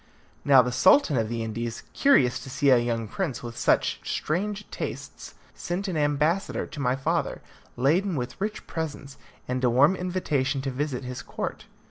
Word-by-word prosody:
Now 135 -3 +7
the 125 - -2
Sultan 155 - +5
of 110 -3 0
the 115 -1 -2
Indies, 115 +1 -4
curious 135 - +4
to - - -9
see 135 +1 +2
a 125 - +6
young 115 -2 -1
prince 145 - -3
with 120 -1 -7
such - - +2
strange 205 +6 -2
tastes, - - -6 0.2
sent 180 +4 -4
an 185 - -2
ambassador 150 +5 +1
to 150 - -10
my 125 -2 +1
father, 155 +3 -1 0.4
laden 170 +9 +2
with 125 +6 -5
rich 210 +1 -3
presents, 145 -4 -6 0.3
and 125 0 -2
a 125 - +4
warm 140 +10 +5
invitation 155 -7 -1
to 135 - -2
visit 135 -1 -3
his 125 0 -6
court. - - -5
140 Hz, 170 wpm, -26 LUFS, 125-170 Hz, 0.4 s, Now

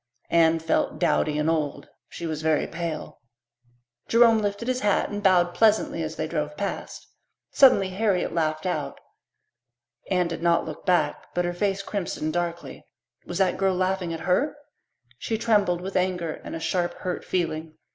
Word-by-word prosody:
Anne 165 -1 +4
felt 160 0 0
dowdy 155 -3 +1
and 150 +1 0
old; 155 -3 -1 0.2
she 170 - -7
was 155 -2 -3
very 155 -1 +2
pale. 165 -1 -5 0.9
Jerome 230 -1 +5
lifted 205 +2 -2
his 255 0 0
hat 205 -4 +1
and 205 0 -4
bowed 180 -3 +4
pleasantly 215 -6 +2
as 160 0 -4
they 155 - -2
drove 150 -2 -3
past. 200 - -5 0.5
Suddenly 225 -8 +5
Harriet 190 -1 0
laughed 155 -1 -1
out. 180 - -3 1.1
Anne 180 -2 +2
did 165 -1 -5
not 170 0 +2
look 155 - -8
back, 180 -1 +1
but 175 0 +1
her 175 - -1
face 195 +1 -1
crimsoned 175 -6 -3
darkly. 170 -1 -4 0.4
Was - - -4
that 190 -2 +2
girl 190 -1 +2
laughing 185 -1 -1
at 165 - -5
her? 260 +12 +1 0.6
She 225 - -2
trembled 205 -6 +2
with 190 +1 -6
anger 180 -3 0
and - - -6
a - - -4
sharp, 175 +1 -1
hurt 180 -1 -4
feeling. 160 -3 -3
175 Hz, 165 wpm, -25 LUFS, 160-195 Hz, 1.1 s, Jerome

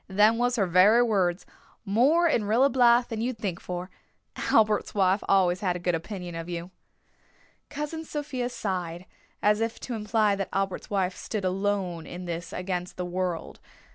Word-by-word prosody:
Them 210 +4 +4
was 245 0 +1
her 205 -5 +2
very 190 +7 +5
words. 190 -6 +1 0.4
'More 270 - +4
in 235 -9 +1
Rilla 240 +7 +3
Blythe 240 -1 +4
than 225 -1 -3
you'd 245 0 -2
think 195 -5 -3
for.' 180 +1 -6 0.4
Albert's 215 -1 +2
wife 195 0 +2
always 185 -2 +3
had 180 -3 0
a - - -4
good 175 0 0
opinion 175 +1 -5
of 165 +1 -6
you." 175 +1 -5 1.0
Cousin 300 +2 -4
Sophia 285 -5 -4
sighed, 180 -6 -4 0.4
as 210 +1 +3
if 225 0 -2
to 250 - -5
imply 215 -1 +1
that 195 -1 -3
Albert's 195 -1 -2
wife 190 -2 0
stood 210 -4 -4
alone 185 -3 -1
in 180 +1 -7
this 170 -1 -5
against 180 -1 -4
the 180 - -3
world. 180 -1 -3
195 Hz, 170 wpm, -27 LUFS, 180-230 Hz, 1.0 s, very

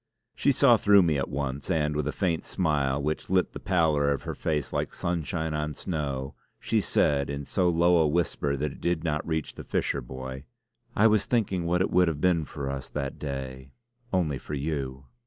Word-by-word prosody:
She 140 - +2
saw 125 -3 +5
through 100 -2 +6
me 80 -4 +1
at 70 - -2
once, 70 +1 -3
and 75 -4 +1
with 75 -1 -1
a - - 0
faint 85 -3 -1
smile, 70 -6 0
which 75 +2 -2
lit 95 -1 +2
the - - -6
pallor 80 -6 +2
of 70 - -2
her - - -4
face 75 -3 -2
like - - -2
sunshine 80 -1 -2
on 75 -1 -2
snow, 70 -5 -3 0.3
she - - +1
said 70 -1 +1
in 70 0 -4
so 90 +2 +1
low 85 +1 +4
a 80 -2 +4
whisper 75 -3 0
that 75 +1 -2
it - - -13
did 85 -2 0
not 75 -2 -1
reach 80 -2 -2
the - - -9
fisher 70 - -1
boy: 65 +2 -7 0.5
"I 105 - +4
was 110 -2 +4
thinking 95 -8 0
what 90 +1 +2
it - - +1
would 90 0 +4
have 80 -3 -1
been 85 -2 +2
for 70 -1 -6
us 70 -1 -4
that 70 -2 -4
day 65 -2 -6 0.4
only 80 -7 0
for 75 - -6
you." 70 -2 -3
75 Hz, 205 wpm, -27 LUFS, 70-85 Hz, 0.5 s, through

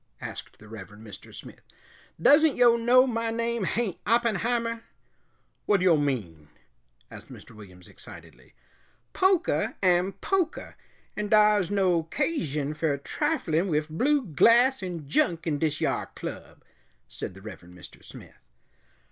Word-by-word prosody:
asked - - -9
the 105 - -16
Reverend 105 0 -11
Mr. 105 -3 -12
Smith. - - -12 0.6
"Doesn't 290 - +5
yo' 240 -1 +5
know 245 +2 +4
my 230 -2 -2
name 230 -2 -2
hain't 225 -5 -2
Oppenheimer?" 230 0 0 0.9
"Whad 200 -3 +2
yo' 180 -3 +5
mean?" 105 - -3 0.6
asked - - -12
Mr. - - -13
Williams 95 -5 -15
excitedly. - - -15 0.6
"Pokah 375 -2 +1
am 180 +1 +2
pokah, 370 -5 -2 0.4
and 210 -1 -4
dar's 210 -4 +4
no 185 -4 +1
'casion 160 - -2
fer 155 -2 -1
triflin' 180 - -1
wif 155 -3 -1
blue 265 - +1
glass 235 - +4
'n 175 -6 -6
junk 165 +3 0
in 150 -3 -1
dis 155 0 -1
yar - - -1
club," - - -9 0.4
said - - -8
the 95 - -13
Reverend 90 -4 -12
Mr. 90 - -14
Smith. - - -14
185 Hz, 130 wpm, -26 LUFS, 145-235 Hz, 0.9 s, Doesn't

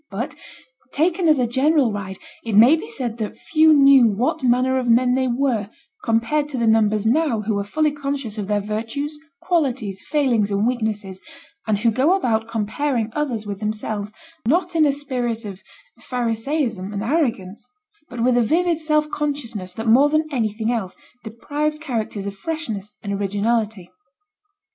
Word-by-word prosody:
But, - - -4 0.6
taken 335 +3 +1
as 310 -2 +5
a 250 - +2
general 265 +1 +2
ride, 190 -2 -5 0.3
it 225 -3 -2
may 240 +8 +8
be 360 +7 -6
said 245 - -4
that 215 -2 -4
few 315 0 +3
knew 275 -4 +7
what 255 +10 0
manner 255 +1 +2
of 245 -2 -2
men 250 +2 +4
they 260 0 +1
were, 240 -5 0 0.3
compared 230 +6 +1
to 270 - -4
the 235 - +1
numbers 215 -1 +3
now 250 -2 +2
who 210 -1 -1
are - - -1
fully 305 +9 0
conscious 275 -6 -4
of 200 - -4
their 205 0 0
virtues, 225 +9 -4 0.3
qualities, 255 - -1
failings, 250 -9 +1
and 200 +1 0
weaknesses, 215 -6 -2 0.5
and 215 -1 +2
who 230 +3 +2
go 275 - +3
about 225 - 0
comparing 230 +2 -2
others 250 -8 -2
with 200 -1 -5
themselves 215 -1 -3 0.4
not 350 +5 +1
in 310 -2 +4
a - - +3
spirit 250 -5 -3
of 195 -2 -8 0.4
Pharisaism 230 -3 -2
and 200 0 -3
arrogance, 230 - -1 0.4
but 245 -2 -4
with 250 0 +3
a - - +4
vivid 335 +7 +1
self 305 -1 +1
consciousness 235 -11 -4
that 225 - -5
more 255 +6 +5
than 310 +1 +1
anything 225 -3 -1
else 215 -6 -3 0.3
deprives 295 +7 -3
characters 225 -9 -4
of 200 0 -5
freshness 210 -6 -5
and 200 -1 -3
originality. 205 -1 -1
235 Hz, 165 wpm, -21 LUFS, 215-290 Hz, 0.6 s, may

